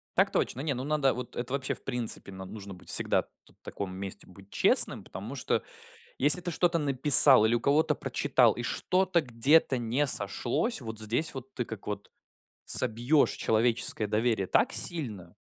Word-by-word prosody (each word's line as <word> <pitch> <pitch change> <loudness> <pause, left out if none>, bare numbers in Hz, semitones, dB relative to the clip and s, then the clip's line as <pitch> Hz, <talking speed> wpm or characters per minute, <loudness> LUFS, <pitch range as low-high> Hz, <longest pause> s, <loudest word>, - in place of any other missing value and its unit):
Так - - +1
точно. 130 - -3
Не, 145 -1 -3
ну 130 0 -7
надо 145 -2 -1
вот 125 -1 -9
это 125 +2 -6
вообще, 135 -1 -2
в - - -13
принципе, 120 -6 -5
нам 95 0 -11
нужно 100 -2 -10
быть 90 - -13
всегда - - +1
т - - -31 0.3
таком 95 -2 -8
месте 95 0 -7
быть 95 +1 -18
честным, - - +3
потому 105 +8 -10
что, 130 - -3 0.5
если 150 +6 +6
ты 175 0 -5
что-то 170 +1 -1
написал 135 -4 +8
или 115 +2 0
у - - -1
кого-то 145 +6 0
прочитал, - - 0
и - - -8
что-то 185 -2 -1
где-то 130 +2 +1
не 120 +5 -2
сошлось, 125 - -2
вот 110 -2 -9
здесь 115 +9 -4
вот 135 0 -11
ты 125 - -4
как 110 -3 -11
вот 100 -1 -7 0.5
собьешь 120 +7 0
человеческое 110 -1 -2
доверие 110 -2 -2
так - - 0
сильно. 105 - -3
125 Hz, 175 wpm, -27 LUFS, 110-145 Hz, 0.5 s, написал